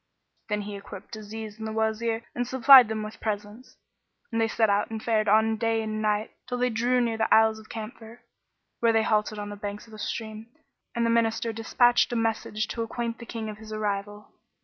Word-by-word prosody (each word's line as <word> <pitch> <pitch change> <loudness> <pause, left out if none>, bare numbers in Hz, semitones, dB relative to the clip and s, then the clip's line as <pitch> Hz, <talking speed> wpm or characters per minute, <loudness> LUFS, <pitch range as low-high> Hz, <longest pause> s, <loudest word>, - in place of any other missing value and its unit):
Then 210 0 0
he 205 0 -6
equipped 200 +2 -9
Aziz 215 0 -8
and 220 - -4
the - - -4
Wazir 225 +1 -1
and 245 0 -2
supplied 260 -1 +8
them 215 0 -3
with 215 0 -8
presents; 210 +3 -5 0.5
and 225 0 0
they 225 - +3
set 225 0 +2
out 200 0 +1
and 225 -1 -4
fared 215 -2 +1
on 220 +2 +4
day 225 0 0
and 215 0 -3
night 210 0 0 0.2
till 250 -1 -3
they 250 0 +1
drew 240 +3 +1
near 230 -2 0
the 220 - 0
Isles 220 0 +5
of 220 - -16
Camphor, 225 +1 -8 0.6
where 230 -1 +3
they 225 0 +3
halted 215 -1 +1
on 205 0 -5
the 205 - -6
banks 205 +1 -6
of 225 - -17
a 215 - -10
stream, 220 0 -5 0.5
and 235 0 +1
the 230 - +2
Minister 230 0 +1
despatched 240 +3 +3
a - - -1
messenger 220 -1 -1
to 230 - -3
acquaint 230 0 -3
the 235 - -10
King 225 -2 -5
of 215 0 -7
his 220 0 -11
arrival. 205 -1 -4
220 Hz, 215 wpm, -26 LUFS, 215-230 Hz, 0.6 s, supplied